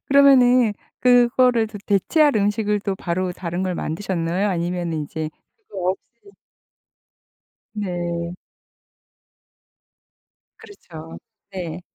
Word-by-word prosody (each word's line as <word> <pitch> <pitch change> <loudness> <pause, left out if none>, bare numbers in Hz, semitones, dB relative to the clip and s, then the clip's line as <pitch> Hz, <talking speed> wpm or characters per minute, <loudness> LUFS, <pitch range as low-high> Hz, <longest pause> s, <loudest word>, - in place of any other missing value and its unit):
그러면은 255 -4 +5 0.3
그거를 245 -1 +4
더 210 -1 -9
대체할 285 - +3
음식을 210 0 +1
또 195 -1 -2
바로 185 0 -2
다른 175 0 -4
걸 185 -1 -1
만드셨나요? 175 +3 -2
아니면 175 -2 -2
인제 155 0 -4 0.4
그거 185 -2 -1
없이 235 - -11 1.4
네. 175 -4 -3 2.2
그렇죠. 165 - -12 0.3
네. 180 -2 -5
190 Hz, 195 characters per minute, -22 LUFS, 175-235 Hz, 2.2 s, 그러면은